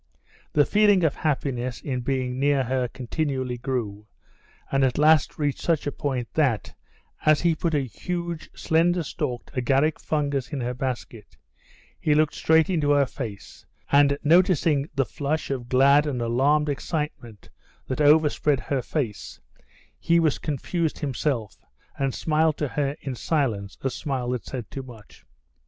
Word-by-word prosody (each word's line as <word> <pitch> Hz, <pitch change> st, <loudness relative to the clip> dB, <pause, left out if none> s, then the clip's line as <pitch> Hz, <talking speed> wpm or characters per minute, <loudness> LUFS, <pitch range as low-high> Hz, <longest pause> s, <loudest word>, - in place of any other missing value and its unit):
The 145 Hz, -1 st, +4 dB
feeling 205 Hz, -3 st, +4 dB
of 155 Hz, -3 st, +3 dB
happiness 130 Hz, -5 st, -2 dB
in 130 Hz, -3 st, -3 dB
being 130 Hz, 0 st, -2 dB
near 140 Hz, -1 st, +2 dB
her 130 Hz, 0 st, -1 dB
continually 130 Hz, 0 st, -3 dB
grew, 110 Hz, -5 st, -3 dB, 0.6 s
and 135 Hz, 0 st, +2 dB
at 130 Hz, -2 st, +1 dB
last 155 Hz, +1 st, +4 dB
reached 145 Hz, -2 st, -1 dB
such 165 Hz, -4 st, 0 dB
a 145 Hz, -, -1 dB
point 130 Hz, -5 st, -3 dB
that, 135 Hz, -9 st, 0 dB, 0.5 s
as 155 Hz, -1 st, +4 dB
he 170 Hz, -1 st, +3 dB
put 160 Hz, 0 st, -1 dB
a 145 Hz, -, +2 dB
huge, 170 Hz, +5 st, -5 dB
slender 170 Hz, +2 st, +2 dB
stalked 140 Hz, -5 st, -4 dB
agaric 135 Hz, +4 st, +1 dB
fungus 145 Hz, -3 st, -2 dB
in 145 Hz, -, -3 dB
her 120 Hz, +1 st, -2 dB
basket, 120 Hz, -, -5 dB, 0.6 s
he 150 Hz, -, +2 dB
looked 155 Hz, -3 st, +2 dB
straight 160 Hz, +6 st, +3 dB
into 160 Hz, -6 st, 0 dB
her 145 Hz, -1 st, +4 dB
face, 115 Hz, -6 st, -8 dB, 0.2 s
and 140 Hz, 0 st, +5 dB
noticing 160 Hz, -3 st, +3 dB
the 135 Hz, -1 st, +2 dB
flush 145 Hz, +3 st, -3 dB
of 125 Hz, -3 st, -4 dB
glad 140 Hz, +3 st, +5 dB
and 135 Hz, -4 st, -2 dB
alarmed 135 Hz, +6 st, +2 dB
excitement 145 Hz, -, -4 dB, 0.3 s
that 130 Hz, +3 st, -3 dB
overspread 150 Hz, -1 st, +4 dB
her 135 Hz, 0 st, -2 dB
face, 120 Hz, -6 st, -4 dB, 0.6 s
he 170 Hz, 0 st, +3 dB
was 160 Hz, -4 st, +1 dB
confused 160 Hz, +2 st, -2 dB
himself, 130 Hz, -, -3 dB, 0.4 s
and 135 Hz, -2 st, 0 dB
smiled 155 Hz, -1 st, +1 dB
to 150 Hz, -, -2 dB
her 140 Hz, 0 st, -1 dB
in 135 Hz, -, -4 dB
silence 115 Hz, -8 st, -1 dB
a 135 Hz, -, -1 dB
smile 130 Hz, -3 st, -3 dB
that 125 Hz, -2 st, -3 dB
said 120 Hz, -6 st, -6 dB
too 135 Hz, -, -5 dB
much. 120 Hz, -5 st, -14 dB
140 Hz, 150 wpm, -25 LUFS, 125-155 Hz, 0.6 s, and